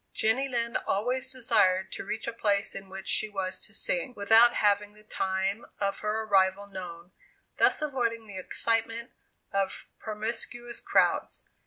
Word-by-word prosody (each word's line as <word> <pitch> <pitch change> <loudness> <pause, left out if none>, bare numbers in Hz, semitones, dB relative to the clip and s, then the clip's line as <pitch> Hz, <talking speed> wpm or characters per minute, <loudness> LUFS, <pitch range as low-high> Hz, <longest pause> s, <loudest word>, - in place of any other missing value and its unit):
'" - - -46
Jenny 235 +5 +2
Lind 235 -2 -1
always 250 +6 0
desired 190 -7 +2
to - - -5
reach 220 -1 -4
a 235 - -3
place 205 -3 +1
in 195 0 -8
which 190 0 -8
she 215 - +1
was 190 -2 -3
to - - -7
sing, - - -1
without 225 +4 +6
having 205 0 +2
the 210 0 -19
time 195 +1 -1 0.2
of 200 -1 -1
her 215 +1 -1
arrival 195 -1 +3
known, 180 -3 -8 0.5
thus - - +4
avoiding 235 -6 -1
the 200 -3 -7
excitement 230 +4 0 0.4
of 195 -1 -1
promiscuous 230 +2 -4
crowds. - - +2
215 Hz, 155 wpm, -29 LUFS, 195-235 Hz, 0.5 s, without